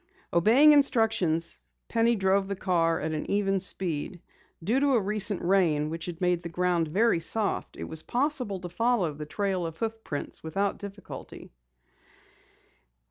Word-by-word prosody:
Obeying 230 - +6
instructions, 225 - +2 0.3
Penny 230 +1 +2
drove 195 -1 +1
the 200 - -3
car 165 -3 +1
at 160 - -3
an 155 -1 -4
even 195 -1 +1
speed. 180 -2 -1 0.4
Due 225 +9 +1
to 280 -1 +2
a - - +4
recent 210 -1 0
rain 165 -5 +2
which 165 +1 -5
had 175 -1 -6
made 180 -2 +1
the 170 - -6
ground 175 -1 0
very 200 +3 +2
soft, 205 +5 -2
it - - -6
was 160 -1 -1
possible 250 - -1
to 180 - -5
follow 195 -3 0
the 150 +1 -8
trail 195 +1 -2
of 165 -1 -5
hoof 225 -1 -4
prints 145 - -6
without 195 +5 -2
difficulty. 200 -1 -9
190 Hz, 155 wpm, -27 LUFS, 170-220 Hz, 0.4 s, Obeying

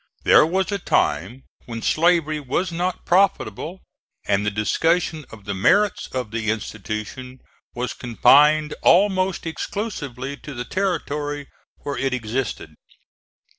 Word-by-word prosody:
There 150 - +6
was 190 +4 0
a 200 - -1
time 105 - 0 0.2
when 115 -1 -6
slavery 160 -2 +2
was 150 +6 -2
not 180 +2 -3
profitable, 180 - +1 0.4
and 100 0 +1
the 105 - +1
discussion 155 - 0
of 105 -3 -13
the 100 - -3
merits 200 - +2
of 125 -5 -4
the 110 -1 -2
institution 110 +4 -5 0.4
was 125 +1 -3
confined 150 +5 +4
almost 190 -1 +3
exclusively 145 - -4
to 145 -2 -9
the 120 0 -4
territory 150 -6 -2 0.3
where 145 - -3
it 135 -1 0
existed. 125 +2 -4
145 Hz, 125 wpm, -22 LUFS, 115-175 Hz, 0.4 s, There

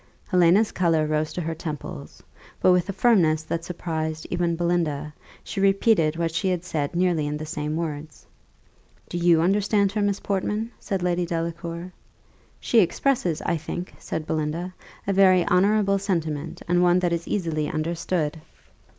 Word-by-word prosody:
Helena's 185 +3 +4
colour 165 -3 +2
rose 155 0 -1
to 180 - -3
her 165 0 -2
temples; 150 - -7 0.4
but, 185 - +5
with 180 +1 +2
a - - +1
firmness 185 -7 +3
that 165 +1 -3
surprised 160 -3 -4
even 175 -1 0
Belinda, 165 -4 -1 0.3
she 195 - -4
repeated 195 -5 +3
what 165 -1 -1
she 190 +3 0
had 180 -1 -1
said 150 -3 -2
nearly 175 -4 +1
in 150 0 -2
the 155 - -6
same 150 0 -3
words. 155 -2 -5 0.8
"Do 175 - -3
you 170 -2 +4
understand 200 +1 +2
her, 210 +1 -1
Miss 205 0 0
Portman?" 210 +3 -2
said 195 -3 -3
Lady 175 -1 0
Delacour. 170 +1 -4 0.7
"She 235 - +3
expresses, 190 - +1
I 170 - 0
think," 175 +3 -6
said 160 - -4
Belinda, 160 +4 -2 0.3
"a 200 - 0
very 185 -2 +5
honourable 200 +2 +3
sentiment, 165 -6 -3
and 175 0 +3
one 175 0 +4
that 175 -1 +1
is 170 0 -3
easily 160 -6 -1
understood." 160 0 -2
170 Hz, 160 wpm, -24 LUFS, 160-185 Hz, 0.8 s, but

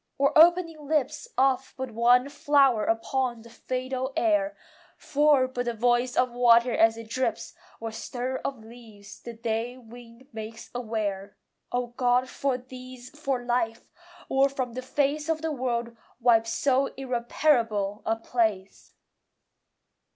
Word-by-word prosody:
or 280 0 +2
opening 330 -2 +4
lips 300 - -1
Of 265 0 +1
but 260 -2 -5
one 245 +3 +4
flower 275 -5 +3
upon 240 +1 -1
the 235 - -15
fatal 255 +2 -4
air, 305 -3 +1 0.4
For 290 -2 +3
but 250 -1 -4
the 240 -1 -2
voice 245 +2 +1
of 250 -1 +2
water 240 0 +4
as 225 0 +4
it 230 -1 -9
drips, 235 0 -2 0.3
Or 225 0 -5
stir 250 +3 -4
of 260 -5 -5
leaves 220 -3 -13
the 235 - -8
day 230 +2 -3
wind 240 +1 -14
makes 220 +1 -8
aware! 210 -4 -4 0.3
O 245 0 0
God, 250 +1 +2
for 275 -2 -1
these, 255 0 -11
for 275 -4 -3
life! 240 -2 -2 0.4
or 270 +1 +3
from 255 -3 -4
the 255 - -4
face 290 +4 -1
Of 320 -1 -1
the 320 - -1
world 240 -4 -2 0.2
wipe 230 -2 +4
so 270 +3 +1
irreparable 235 -5 0
a 225 - 0
place! 220 -4 -2
245 Hz, 140 wpm, -26 LUFS, 230-270 Hz, 0.4 s, opening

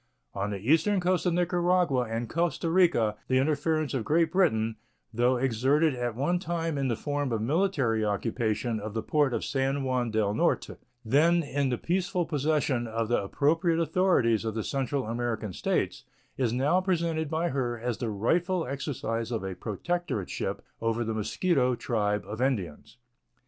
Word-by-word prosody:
On 100 +1 -2
the 100 - -3
eastern 160 - +2
coast 180 0 +1
of 175 - +2
Nicaragua 175 -6 +2
and 115 +1 -2
Costa 170 +4 -1
Rica 165 - +3
the 130 - +2
interference 155 +2 +1
of 130 -4 -1
Great 160 +6 +2
Britain, 115 - +2 0.4
though 120 +3 +2
exerted 135 +5 +2
at 120 -2 -3
one 175 +8 0
time 165 -2 -2
in 135 -1 0
the 120 - 0
form 145 +2 -2
of 115 - 0
military 135 - +1
occupation 110 +2 -1
of 105 +1 -6
the 110 - -1
port 145 -3 +2
of - - -2
San 135 +1 0
Juan 125 -2 0
del 110 -2 +1
Norte, - - 0 0.3
then 165 +8 +4
in 140 -1 -1
the 125 - 0
peaceful 180 +2 -1
possession 145 -5 0
of 115 0 -2
the 120 - +1
appropriate 165 - +1
authorities 165 - +2
of 110 -1 -3
the 110 - -2
Central 135 0 -1
American 115 -3 -3
States, - - -1 0.3
is 125 -4 0
now 140 +9 +2
presented 165 -4 0
by 165 +2 0
her 120 -3 -2
as 120 0 -3
the 120 - -2
rightful 165 - 0
exercise 120 -4 -3
of 115 -4 -2
a 95 -1 -3
protectorship 110 - -3 0.2
over 115 +1 0
the 115 0 -2
Mosquito 125 - +1
tribe 105 -5 -1
of 105 +4 -6
Indians. 110 - -2
130 Hz, 165 wpm, -28 LUFS, 115-165 Hz, 0.4 s, then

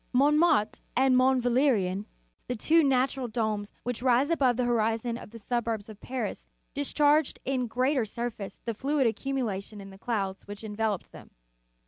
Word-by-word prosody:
Mont 285 +4 +4
martre 300 -10 +3 0.2
and 260 0 +4
Mont 255 0 +4
Valerien, 235 -7 +2 0.4
the 250 - -2
two 320 +8 +4
natural 265 -1 +1
domes 215 -2 -2
which 245 -1 -3
rise 255 +4 +3
above 260 -7 +3
the 250 - +1
horizon 230 0 0
of 235 - -9
the 230 - -11
suburbs 230 -2 -2
of 210 -2 -12
Paris, 255 0 -4 0.3
discharged 290 +1 +2
in 255 -2 0
greater 255 +3 +1
sur 235 +3 -3
face 195 -3 -9
the 230 - -1
fluid 275 +4 0
accumulated 225 -5 -2
in 195 0 -10
the 195 - -14
clouds 195 -5 -3
which 205 +1 -8
enveloped 215 -2 -2
them. - - -13
240 Hz, 165 wpm, -28 LUFS, 215-265 Hz, 0.4 s, Mont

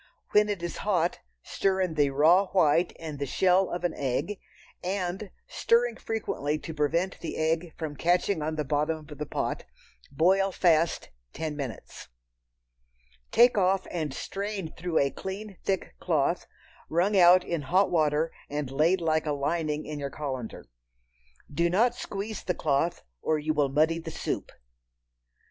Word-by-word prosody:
When 210 0 +4
it 200 -4 -3
is 175 - -4
hot, 180 -4 0 0.2
stir 190 -1 0
in 185 -3 0
the 145 -2 +3
raw 165 +8 +4
white 170 -2 +3
and 155 -3 -7
the 140 - -2
shell 185 +5 +3
of 175 0 -4
an 175 - 0
egg, 145 +9 -2 0.4
and, 190 +1 -3 0.2
stirring 235 0 +2
frequently 155 -9 -2
to 160 - -7
prevent 165 +5 0
the 165 - -5
egg 160 +1 -1
from 155 -3 -4
catching 175 +2 +1
on 155 +1 -2
the 150 - -1
bottom 150 +2 -1
of 150 - -8
the 150 - -3
pot, - - -2 0.5
boil 190 +6 +3
fast 170 -3 +2 0.2
ten 155 -2 -4
minutes. 135 -7 -7 1.2
Take 240 -2 +5
off 190 0 +2
and 155 -5 -2
strain 195 +3 -4
through 170 -1 -2
a 140 -1 +3
clean 195 +1 -7
thick 190 -2 -2
cloth, - - 0 0.4
wrung 180 +6 +2
out 180 0 +7
in 170 -4 -2
hot 185 +8 +2
water 155 -1 +2 0.2
and 145 -2 -3
laid 165 +7 +2
like 160 -1 +1
a 150 - +1
lining 150 +1 -1
in 150 -1 -5
your 140 -1 -3
colander. 130 -6 -5 0.9
Do 170 +4 +2
not 225 +7 +3
squeeze 210 -2 -5
the 180 - -1
cloth, 155 +3 0 0.2
or 155 - +1
you 155 +1 -1
will 145 -2 +2
muddy 155 +4 +2
the 165 0 -7
soup. - - -4
165 Hz, 160 wpm, -28 LUFS, 150-190 Hz, 1.2 s, out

